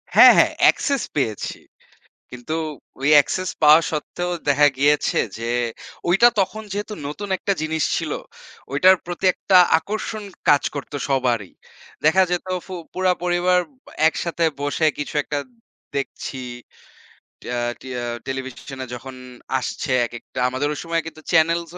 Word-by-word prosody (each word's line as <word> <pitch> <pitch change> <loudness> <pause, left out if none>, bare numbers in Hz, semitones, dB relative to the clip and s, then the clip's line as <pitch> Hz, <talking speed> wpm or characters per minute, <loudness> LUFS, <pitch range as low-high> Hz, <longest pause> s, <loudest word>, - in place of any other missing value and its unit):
হ্যাঁ, - - +10
হ্যাঁ, - - +5
অ্যাক্সেস 280 -3 +3
পেয়েছি। 115 -8 -2 0.7
কিন্তু 125 +5 -6 0.5
ওই 135 - +1
অ্যাক্সেস 180 +5 +3
পাওয়া 155 +1 +8
সত্ত্বেও 175 +3 -3 0.2
দেখা 145 +1 +5
গিয়েছে 145 +1 +2 0.2
যে 115 +1 -3 0.6
ঐটা 195 +7 +6
তখন 215 +3 -1
যেহেতু 205 +1 -4
নতুন 200 +8 -6
১ - - -27
টা - - +5
জিনিস 155 0 -1
ছিল, - - -2 0.6
ঐটার 185 +7 +6
প্রতি 175 +2 -6
একটা 190 - +2 0.2
আকর্ষণ 215 +5 -5 0.3
কাজ 145 - +6
করতো 145 0 -5
সবারই। 125 -7 0 0.5
দেখা 160 +5 +5
যেত 180 +1 -1 0.2
ফু 190 - -7 0.2
পুরা 185 0 +2
পরিবার 180 +1 +2
ব 265 -3 -32 0.2
একসাথে 170 +1 -2 0.2
বসে 145 +3 0
কিছু 145 - -5
একটা 145 - -3 0.6
দেখছি। 135 -1 -4 1.1
ট্যা 125 - -3 0.2
টিয়া 125 -2 -5 0.2
টেলিভিশনে 130 0 -6
যখন 130 +2 -8 0.4
আসছে 135 +3 -4
একেকটা 120 +2 -8
আমাদের 130 +3 -1
ওই - - -6
সময় 165 0 -1
কিন্তু 155 -1 -10
চ্যানেলস 165 0 +2
155 Hz, 135 wpm, -22 LUFS, 135-180 Hz, 1.1 s, হ্যাঁ